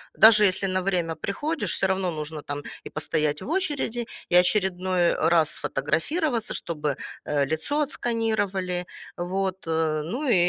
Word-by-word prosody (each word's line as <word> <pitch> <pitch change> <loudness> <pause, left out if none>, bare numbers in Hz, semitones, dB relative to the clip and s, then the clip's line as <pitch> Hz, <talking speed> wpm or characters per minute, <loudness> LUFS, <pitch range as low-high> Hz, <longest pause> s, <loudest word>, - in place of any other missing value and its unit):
даже 215 -1 +8
если 195 0 +2
на 185 0 0
время 175 -4 0
приходишь, 295 +10 -2
всё - - +5
равно 190 -2 0
нужно 155 0 -5
там 145 0 -5 0.3
и - - -6
постоять 150 0 0
в - - -7
очереди, 290 -10 -1 0.2
и - - +2
очередной 185 -2 +2
раз 160 -1 +3
сфотографироваться, 230 - -1
чтобы, 150 -4 -2 0.3
э, 145 -1 +1
лицо 285 - 0
отсканировали. 205 - -1 0.3
Вот. 190 +2 -2 0.4
Ну 260 - -3
и, - - +5
185 Hz, 135 wpm, -25 LUFS, 165-225 Hz, 0.4 s, даже